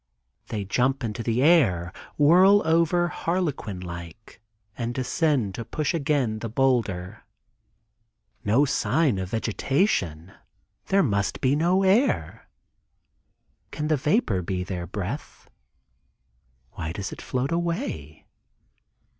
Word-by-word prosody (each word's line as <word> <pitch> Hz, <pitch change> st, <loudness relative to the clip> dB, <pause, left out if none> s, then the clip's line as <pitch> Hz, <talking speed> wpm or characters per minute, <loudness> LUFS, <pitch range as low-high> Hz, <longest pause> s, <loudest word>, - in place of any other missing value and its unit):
They 105 Hz, -3 st, -4 dB
jump 130 Hz, +6 st, 0 dB
into 115 Hz, 0 st, -3 dB
the 115 Hz, +2 st, 0 dB
air, 105 Hz, -, +3 dB, 0.2 s
whirl 185 Hz, +7 st, +6 dB
over 170 Hz, +2 st, +2 dB
harlequin 165 Hz, -, -2 dB
like 85 Hz, +5 st, -9 dB, 0.3 s
and 120 Hz, 0 st, -4 dB
descend 130 Hz, -, 0 dB
to 115 Hz, -, -5 dB
push 150 Hz, +8 st, -2 dB
again 140 Hz, -8 st, 0 dB
the 115 Hz, -, -5 dB
boulder. 110 Hz, -6 st, 0 dB, 1.2 s
No 115 Hz, +8 st, +3 dB
sign 130 Hz, -2 st, +1 dB
of 95 Hz, -1 st, -4 dB
vegetation; 110 Hz, -, -1 dB, 0.5 s
there 195 Hz, 0 st, +3 dB
must 100 Hz, -, -1 dB
be 130 Hz, +2 st, +2 dB
no 175 Hz, +5 st, +2 dB
air. 205 Hz, +8 st, +1 dB, 1.2 s
Can 150 Hz, 0 st, -4 dB
the 155 Hz, -, +4 dB
vapor 145 Hz, -, +1 dB
be 90 Hz, +1 st, -3 dB
their 90 Hz, -2 st, -5 dB
breath? 105 Hz, +9 st, -6 dB, 1.2 s
Why 80 Hz, +1 st, -5 dB
does 95 Hz, +2 st, -5 dB
it -, -, -8 dB
not -, -, -10 dB
float 130 Hz, +3 st, -2 dB
away? 165 Hz, -, -3 dB
125 Hz, 115 wpm, -25 LUFS, 100-160 Hz, 1.2 s, whirl